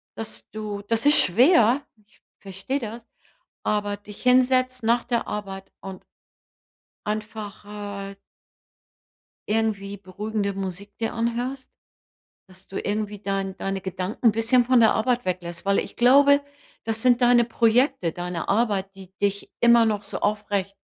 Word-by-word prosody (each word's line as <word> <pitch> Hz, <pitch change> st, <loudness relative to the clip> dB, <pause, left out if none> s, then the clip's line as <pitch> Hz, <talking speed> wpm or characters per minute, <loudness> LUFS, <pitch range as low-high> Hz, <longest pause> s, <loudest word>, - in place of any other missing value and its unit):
dass 225 Hz, 0 st, -6 dB
du 210 Hz, -2 st, -5 dB
das 230 Hz, +4 st, -1 dB
ist 295 Hz, -, +7 dB
schwer, 245 Hz, -, +4 dB, 0.2 s
ich 215 Hz, -, -30 dB, 0.2 s
verstehe 195 Hz, +8 st, -4 dB
das, 230 Hz, 0 st, -7 dB, 0.6 s
aber 205 Hz, -1 st, -1 dB
dich 205 Hz, 0 st, -13 dB
hinsetzt 255 Hz, 0 st, +3 dB
nach 235 Hz, +2 st, +2 dB
der 235 Hz, -2 st, -1 dB
Arbeit 195 Hz, -2 st, -6 dB
und 190 Hz, -1 st, -9 dB, 1.0 s
einfach 210 Hz, -1 st, -5 dB
halt 200 Hz, -1 st, -7 dB, 1.3 s
irgendwie 205 Hz, -2 st, -1 dB
beruhigende 200 Hz, +1 st, -3 dB
Musik 195 Hz, +1 st, -6 dB
dir 225 Hz, -, -2 dB
anhörst, 240 Hz, +3 st, -3 dB, 0.8 s
dass 185 Hz, 0 st, -15 dB
du 195 Hz, -, -6 dB
irgendwie 210 Hz, 0 st, -3 dB
dein 195 Hz, -1 st, -3 dB
deine 195 Hz, 0 st, -3 dB
Gedanken 190 Hz, +5 st, -2 dB
'n 225 Hz, -, +7 dB
bisschen 230 Hz, +3 st, +2 dB
von 250 Hz, 0 st, +4 dB
der 225 Hz, -, +5 dB
Arbeit 245 Hz, +2 st, 0 dB
weglässt. 175 Hz, -1 st, -4 dB
Weil 200 Hz, 0 st, +2 dB
ich -, -, -6 dB
glaube, 280 Hz, +3 st, +5 dB, 0.4 s
das 225 Hz, 0 st, -3 dB
sind 250 Hz, -1 st, +4 dB
deine 245 Hz, -1 st, +5 dB
Projekte, 230 Hz, -, +2 dB
deine 175 Hz, -1 st, -5 dB
Arbeit, 200 Hz, -3 st, 0 dB
die 190 Hz, -1 st, -13 dB
dich 200 Hz, 0 st, -1 dB
immer 235 Hz, -1 st, +6 dB
noch 210 Hz, -2 st, 0 dB
so 200 Hz, -, -6 dB
aufrecht, 205 Hz, -2 st, -1 dB
210 Hz, 140 wpm, -24 LUFS, 195-235 Hz, 1.3 s, ist